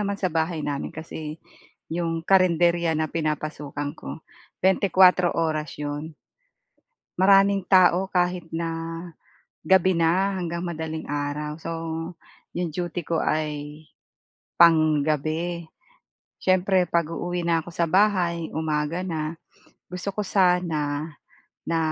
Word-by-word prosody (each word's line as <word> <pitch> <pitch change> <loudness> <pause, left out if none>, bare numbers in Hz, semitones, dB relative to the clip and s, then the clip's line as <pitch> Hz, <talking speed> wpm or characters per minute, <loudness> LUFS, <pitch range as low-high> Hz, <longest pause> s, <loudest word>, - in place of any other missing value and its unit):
naman 200 -1 -1
sa 185 -4 -2
bahay 160 -1 -1
namin 140 -1 -3
kasi, 155 -1 -7 0.6
'yong 165 -1 -2
karenderya 170 -3 +3
na 155 -1 -2
pinapasukan 150 -2 -3
ko, 160 0 -9 0.4
24 185 -2 +5
oras 155 -2 -1
'yon. 150 +2 -5 1.0
Maraming 195 0 +5
tao 185 0 +5
kahit 180 -1 0
na, 165 0 -2 0.9
gabi 185 +2 +4
na 185 +4 +2
hanggang 170 -2 -3
madaling 160 -2 -5
araw. 145 +1 -3
So, 165 - -5 0.8
yung 175 -1 -2
duty 175 0 -3
ko 165 -1 0
ay, 150 0 -2 0.8
panggabi. 155 +1 +3 0.7
Siyempre 185 0 +3
'pag-uuwi 170 +2 -1
na 165 -1 +2
ako - - -9
sa 170 - +1
bahay, 180 -3 +2
umaga 155 +1 -1
na, 160 -2 -3 0.5
gusto 180 +2 -4
ko 210 - -2
sana 165 -6 +1 0.6
na 165 0 +1
165 Hz, 110 wpm, -24 LUFS, 155-180 Hz, 1.0 s, 24